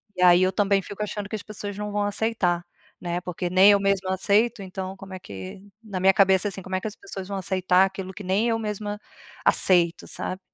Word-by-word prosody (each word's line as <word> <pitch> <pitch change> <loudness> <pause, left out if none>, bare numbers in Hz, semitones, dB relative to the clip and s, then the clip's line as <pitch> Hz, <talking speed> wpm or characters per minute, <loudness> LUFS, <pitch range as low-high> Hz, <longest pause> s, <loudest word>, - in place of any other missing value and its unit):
E 180 - -4
aí, 180 0 +7
eu 185 - +2
também 200 -1 +2
fico 205 +2 -8
achando 205 -1 -4
que - - -3
as 215 - -6
pessoas 205 -1 -7
não 210 0 -4
vão 205 0 0
aceitar, 205 -4 0 0.3
né, 175 0 -3
porque 180 0 -4
nem 190 +3 +7
eu 200 - +4
mesma 195 -1 0
aceito, 210 +4 +2
então 190 0 -6
como 195 0 -11
é 185 - -6
que 95 - -9 0.2
na 200 -4 -5
minha 190 +1 +5
cabeça, 190 -1 +4
assim, 195 0 -7
como 190 0 -5
é 185 - +1
que - - -10
as 210 - -7
pessoas 195 -1 -8
vão 200 0 -4
aceitar 185 0 +2
aquilo 190 0 -6
que 205 - -9
nem 195 +5 +1
eu 225 0 0
mesma 210 -1 -4 0.5
aceito, 175 -2 +3
sabe? 185 - -5
195 Hz, 230 wpm, -25 LUFS, 185-205 Hz, 0.5 s, aí